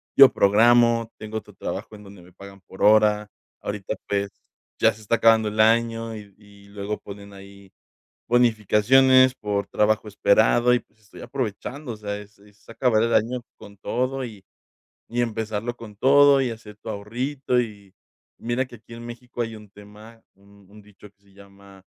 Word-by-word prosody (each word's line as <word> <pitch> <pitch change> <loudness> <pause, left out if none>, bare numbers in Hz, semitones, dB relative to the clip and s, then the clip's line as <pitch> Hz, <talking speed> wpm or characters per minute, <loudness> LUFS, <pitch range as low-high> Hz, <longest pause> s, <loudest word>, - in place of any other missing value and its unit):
yo 135 -1 +9
programo, 115 +2 +4
tengo 110 0 -6
otro - - -9
trabajo 110 - -6
en 105 - -14
donde 100 -2 -14
me 90 0 -19
pagan 100 0 -13
por 95 - -9
hora, 105 0 +4 0.3
ahorita, 100 -1 -5
pues, 100 0 -1 0.5
ya - - +4
se 110 - -16
está 110 +2 0
acabando 115 -1 +4
el 105 +1 -7
año 115 0 +2
y 105 -2 -12
y 100 -1 -19
luego 100 +1 -5
ponen 100 0 -11
ahí 100 0 -15 0.6
bonificaciones 125 +3 +4
por 100 -3 -3
trabajo 110 0 0
esperado 115 +4 +3
y, 125 - +2
pues, 110 - -28
estoy 100 - -15
aprovechando, 130 +2 -5
o - - -10
sea, 105 -1 -5
es 105 0 -15
es 105 0 -23
acabar 115 -2 +1
el 115 0 0
año 120 +3 +1 0.2
con 100 0 -14
todo 130 +5 -2
y 105 -5 -11 0.7
y 120 +1 -2
empezarlo 110 0 -3
con 105 -4 -12
todo 140 +3 +5
y 125 - -1
hacer 110 -2 -10
tu - - -9
ahorrito 125 +5 -2
y 100 -5 -8 0.4
mira 120 +3 -2
que 120 - -13
aquí 115 +1 -15
en 120 0 -10
México 120 0 -6
hay 115 -1 -6
un 105 -1 -14
tema, 105 +3 -15
un 100 0 -22
un 105 0 -15
dicho 105 0 -17
que 100 0 -48
se 100 -1 -26
llama: 100 -1 -17
110 Hz, 180 wpm, -23 LUFS, 100-120 Hz, 0.7 s, yo